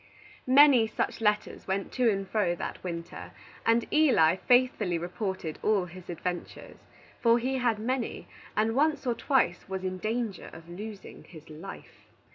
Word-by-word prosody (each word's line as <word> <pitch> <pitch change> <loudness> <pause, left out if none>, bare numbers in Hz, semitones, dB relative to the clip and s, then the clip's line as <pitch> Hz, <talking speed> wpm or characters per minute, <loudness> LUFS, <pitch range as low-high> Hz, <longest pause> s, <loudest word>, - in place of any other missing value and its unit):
Many 260 -3 +7
such 220 - -3
letters 210 -1 0
went 195 0 -2
to 250 -2 +2
and 195 -2 -1
fro 185 -5 +1
that - - -6
winter, 170 -2 -6 0.3
and 230 +1 +3
Eli 255 - +5
faithfully 245 -7 +2
reported 180 -1 -4
all 205 -4 +2
his 180 0 -12
adventures. 175 +1 -5 0.4
For 235 0 +4
he 260 +2 -1
had 235 -3 +1
many, 240 +3 -3 0.3
and 220 +1 +2
once 295 +2 +1
or 245 - +1
twice 230 -9 0
was 190 -1 -4
in 185 0 -3
danger 220 -1 -3
of 165 +1 -12
losing 200 +4 -9
his 160 -2 -14
life. 165 +6 -11
210 Hz, 150 wpm, -28 LUFS, 180-240 Hz, 0.4 s, Many